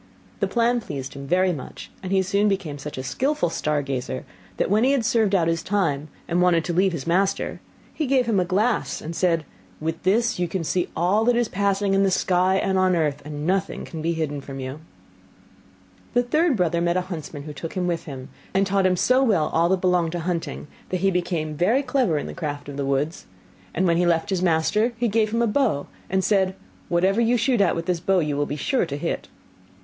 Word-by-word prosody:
The - - +1
plan 240 0 +1
pleased 135 -9 -6
him 140 0 -8 0.3
much, 130 - -9
and 185 - -5
he 190 -1 +3
soon 200 +2 +2
became 185 -8 -2
such 145 0 -7
a 130 - -4
skilful 260 - 0
star 150 -3 0
gazer, 130 -1 -4 0.3
that - - 0
when 215 +3 +4
he 270 +2 +4
had 255 -5 +1
served 215 -3 +2
out 170 -3 +2
his 165 0 0
time, 165 -8 0 0.2
and 175 +1 +1
wanted 175 -2 +3
to 175 - -2
leave 190 +2 +3
his 165 -6 -5
master, 190 +3 0 0.3
he 310 - -2
gave 260 -1 +3
him 220 -4 +2
a - - +3
glass, 205 +6 0
and 165 +2 -6
said, 165 -4 +1 0.3
'With 160 +1 -3
this 230 +3 +2
you 175 - +1
can 175 0 -3
see 175 +2 -1
all 185 +6 +2
that 245 0 +4
is 240 -1 +2
passing 200 0 0
in 195 - +3
the 195 - +3
sky 185 0 +2
and 190 0 +1
on 185 -1 +3
earth, 150 -4 0
and 150 0 -6
nothing 190 +2 -1
can 160 - -7
be 165 +2 0
hidden 150 -3 -3
from 135 0 -8
you.' 130 +3 -5 1.4
The 245 - +4
third 305 +2 +2
brother 170 -2 +1
met 170 +1 +1
a - - +2
huntsman, 160 -5 -7
who 150 0 -7
took 160 +3 -6
him 185 -1 -1
with 170 -2 -2
him, 135 -2 -8 0.3
and 195 +1 +4
taught 195 -1 +2
him 180 -1 +1
so 255 +7 +3
well 195 - +2
all 165 +1 +3
that 190 -1 +1
belonged 180 -3 +2
to 175 - -2
hunting, 170 -2 -3 0.2
that 185 -1 -2
he 195 0 +3
became 170 -4 -1
very 210 - +2
clever 250 - +1
in - - -3
the - - -6
craft 145 -3 -5
of 140 - -7
the 140 -1 -2
woods; 140 +4 -1 0.4
and 185 - 0
when 170 -2 +3
he 175 0 +2
left 170 +3 +1
his 185 -2 0
master 185 +7 +2
he 240 +1 +1
gave 215 0 +2
him 230 +1 +1
a - - +4
bow, 220 - +1 0.2
and 190 0 +1
said, 190 -2 +2 0.3
'Whatever 190 +5 +2
you 235 +1 +3
shoot 240 -1 +2
at 195 - +3
with 165 0 -3
this 180 -2 0
bow 190 +3 +2
you 150 -4 0
will 145 0 0
be 145 - -3
sure 185 - 0
to 140 - -4
hit. - - -3
180 Hz, 230 wpm, -24 LUFS, 160-200 Hz, 1.4 s, when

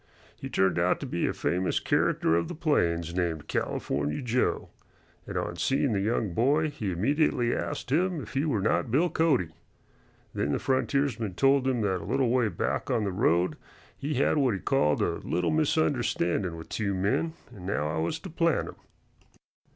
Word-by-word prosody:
He 135 - -7
turned 95 -7 +2
out - - +2
to - - -3
be - - -1
a - - +1
famous 90 0 0
character 80 - +1
of 85 0 0
the - - -6
plains 85 - 0
named 85 -4 -2
"California 75 +2 -2
Joe," 125 +1 0 0.6
and - - -4
on 85 - -3
seeing 135 - +1
the 100 - +1
young 105 -2 0
boy 145 - +2
he 105 -9 -3
immediately 120 - +1
asked 125 - -4
him 175 +3 +1
if - - -9
he 135 - +1
were 130 -11 0
not 115 +3 +1
Bill 160 +9 +2
Cody. 140 - +2 0.8
Then 70 +1 -1
the - - +1
frontiersman 130 -6 0
told 135 +2 +3
him 125 -3 +1
that 95 -3 0
a - - -8
little 130 -1 +2
way 125 -1 +2
back 90 - -2
on 120 -4 +1
the 100 - -1
road 90 -2 +1 0.4
he 145 +2 -3
had 140 +4 +2
what 130 -7 +2
he - - -4
called 75 - +1
"a - - 0
little 90 +2 -1
misunderstandin' 125 - +1
with 80 - -10
two 100 -3 -1
men, 105 - 0 0.2
and 90 -2 -9
now 75 -7 0
I 80 - 0
has 85 - -1
to 190 - -8
plant 165 -1 +1
'em." - - -10
115 Hz, 185 wpm, -28 LUFS, 90-140 Hz, 0.8 s, told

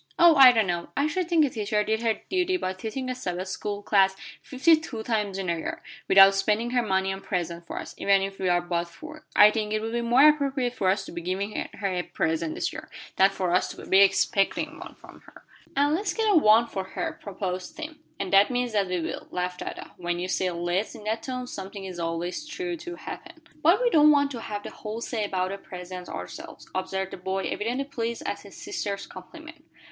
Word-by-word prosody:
"Oh, 340 -1 +7
I 265 -3 +10
don't 225 -3 +2
know. 175 -2 -2
I 280 - +3
should 340 +3 -1
think 325 -3 +4
a - - -1
teacher 210 -1 0
did 220 +1 -1
her 225 -2 0
duty 370 0 +1
by 185 - -2
teaching 220 +7 -5
a 255 - -1
Sabbath 185 -6 -4
school 205 +2 -4
class 195 -2 +3 0.3
fifty 285 +5 +4
two 260 -8 -6
times 210 -4 -1
in 195 -1 -3
a 170 - +1
year, 160 - -5 0.2
without 195 0 +8
spending 210 +4 0
her 250 -1 +2
money 190 -3 0
on 195 - -8
presents 170 -2 -3
for - - -6
us, - - -6
even 195 -1 +3
if 195 0 -5
we 185 - 0
are 175 0 +2
but 175 -1 -1
four. 310 - -12
I 210 +1 +8
think 210 -1 -2
it 215 - +1
would 225 +1 -4
be 235 0 -1
more 245 +5 +6
appropriate 275 -4 +2
for 195 -7 +1
us 195 - 0
to - - -9
be 170 - -6
giving 195 +4 -3
her 200 - -2
a 180 - 0
present 160 -2 -2
this - - -2
year, - - -8 0.3
than 195 +1 +6
for 185 -3 -2
us 180 - +3
to - - -10
be 190 - +4
expecting 195 0 +2
one - - -10
from - - -16
her." - - -16 0.3
"And 285 +2 +3
let's 395 +6 -1
get 450 -1 +1
up 400 - +5
one 220 +1 +6
for 195 -4 -4
her," 190 - -5
proposed 185 -2 -5
Tim. 310 0 -7 0.2
"And 195 -1 -3
that 195 +1 +6
means 245 -2 -1
that 200 -2 +2
we 180 -1 -1
will," - - -5
laughed 180 0 -3
Ada. - - -7
"When 175 0 -2
you 180 +1 -3
say, 185 0 0
'let's' 175 +4 -2
in 215 - -11
that 220 +2 -2
tone 255 -1 -4
something 195 -3 -7
is 185 -2 -7
always 175 - -3
sure 355 +2 -3
to 345 +1 -8
happen." 320 - -9 0.2
"But 340 +7 +5
we - - +2
don't 305 -3 +6
want 285 -1 +4
to 240 -4 -6
have 205 -2 -5
the - - -7
whole 220 +2 -6
say 230 -2 -2
about 185 -1 -1
the 200 - -5
presents 180 -1 -8
ourselves," 90 0 -8
observed 190 0 -2
the - - -7
boy, 190 +1 -3
evidently 245 +6 -2
pleased 235 -4 -4
at - - -2
his - - -13
sister's 205 - -4
compliment. 315 - -12
205 Hz, 235 wpm, -26 LUFS, 185-260 Hz, 0.3 s, I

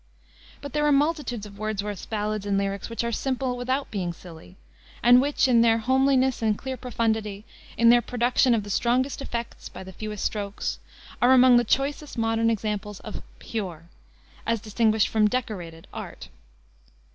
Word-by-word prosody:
But 285 -2 -8
there 300 0 +1
are - - +4
multitudes 285 -6 0
of 200 -1 -12
Wordsworth's 210 -2 -3
ballads 215 -1 -2
and 200 -1 +1
lyrics 195 +1 -2
which 230 0 -3
are 235 - -1
simple 260 +1 -1
without 255 +3 -2
being 180 -4 -2
silly, 170 +1 -13 0.5
and 245 +1 +7
which, 285 0 +2
in 240 -2 +5
their 225 -1 +4
homeliness 260 +1 +2
and 215 -2 +1
clear 265 0 -5
profundity, 220 -4 -2 0.3
in 230 0 +6
their 240 0 +5
production 245 +1 +2
of 215 - -1
the 205 - -7
strongest 255 +6 +1
effects 235 -3 -5
by - - -9
the 190 0 -11
fewest 210 +1 -5
strokes, 205 -1 -3 0.4
are 245 +2 +6
among 255 -1 +7
the 240 - +4
choicest 275 +4 -1
modern 225 0 +1
examples 210 -2 -3
of 215 - -7 0.2
pure, 175 -7 -6 0.6
as 230 0 +1
distinguished 220 0 +2
from 215 -1 +3
decorated, 190 -9 -4
art. - - -8
225 Hz, 165 wpm, -25 LUFS, 210-255 Hz, 0.6 s, and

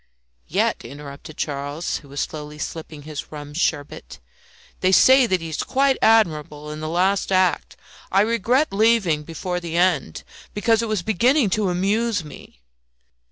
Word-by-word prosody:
"Yet," - - 0
interrupted 145 +2 -10
Charles, 145 +3 -3
who 140 - -15
was 140 0 -4
slowly 150 -1 -6
sipping 155 -1 -7
his 150 -1 -7
rum 145 -1 -8
sherbet, 145 - -3 0.6
"they 185 - +2
say 260 +5 +6
that 185 -5 0
he 165 - -6
is 155 - -3
quite 270 0 +1
admirable 150 -9 +2
in 155 - -7
the 155 0 -4
last 190 +4 +1
act. 185 -3 +1 0.3
I 195 - +4
regret 230 +5 +1
leaving 205 -7 +3
before 175 +3 -4
the 170 -1 -4
end, 175 - +1 0.3
because 225 +2 +2
it 230 - -2
was 215 -5 -1
beginning 230 - +2
to 205 0 +1
amuse 205 +3 0
me." 145 - -13
175 Hz, 155 wpm, -22 LUFS, 150-215 Hz, 0.6 s, say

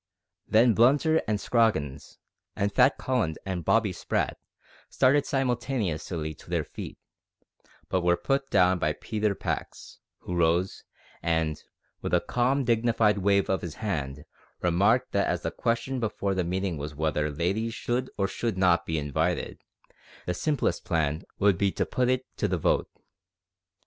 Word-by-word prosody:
Then 115 +2 +5
Blunter 145 +8 +4
and 105 -1 0
Scroggins, 105 - 0 0.4
and 100 0 -1
Fat 135 - +4
Collins 115 -12 -1
and 95 -3 -3
Bobby 105 +2 +2
Sprat, - - -2 0.5
started 140 +2 +3
simultaneously 110 - -1
to - - -17
their - - 0
feet, - - -8 0.9
but 95 - 0
were 85 0 +3
put 135 +9 -1
down 90 0 +4
by - - +1
Peter 105 -2 -2
Pax, - - -5 0.2
who 90 - -6
rose, 85 +2 +1 0.4
and, 80 -2 0 0.4
with - - 0
a - - +4
calm 130 +3 +1
dignified 115 -3 +2
wave 100 0 +2
of 95 - 0
his 85 -3 -6
hand, 75 -9 -3 0.4
remarked 100 +8 +3
that - - +1
as - - -1
the - - -1
question 120 +3 -1
before 100 -3 -1
the 95 -1 0
meeting 90 0 -2
was 75 +1 -6
whether 75 0 0
ladies 95 +10 -1
should 125 +2 -2
or 100 -1 +1
should 110 +1 -3
not 90 -2 +3
be 80 - -1
invited 80 +4 -1
to - - -39
the - - -36
soiree, - - -24
the 90 - -1
simplest 145 - -1
plan 80 -1 0
would 100 -3 +3
be 100 -1 +2
to - - -1
put 125 -1 0
it 130 0 +1
to 105 - +1
the 90 -2 0
vote. 80 - +1
100 Hz, 160 wpm, -27 LUFS, 85-115 Hz, 0.9 s, Then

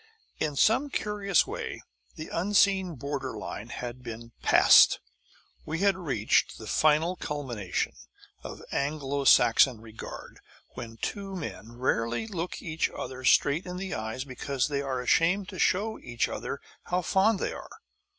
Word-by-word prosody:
In 150 -2 -1
some 225 - +3
curious 205 - +1
way - - -6 0.3
the 155 - -7
unseen 190 -1 +2
border 135 -2 -4
line 105 +1 -6
had 120 +1 -6
been 115 -1 -8
passed. - - +7 0.6
We 165 +3 -4
had 200 -1 +4
reached 135 - +1
the 110 - -9
final 155 - +2
culmination 130 - -3 0.5
of - - -8
Anglo 140 -1 -2
Saxon 130 -3 +6
regard 110 -1 -10 0.3
when 115 -1 -9
two 195 - -4
men 120 -9 -7
rarely 120 - -1
look 180 -5 -5
each 160 -1 -1
other 130 0 -7
straight 145 +6 +3
in 180 0 -5
the 190 0 -4
eyes 110 +4 -4
because 135 0 -2
they 140 -1 -1
are 130 -2 -2
ashamed 175 +9 +2
to - - -8
show 215 +4 +1
each 120 -1 -1
other - - -5 0.2
how 180 0 -1
fond 195 +5 +3
they - - -2
are. - - -9
145 Hz, 145 wpm, -28 LUFS, 125-185 Hz, 0.6 s, passed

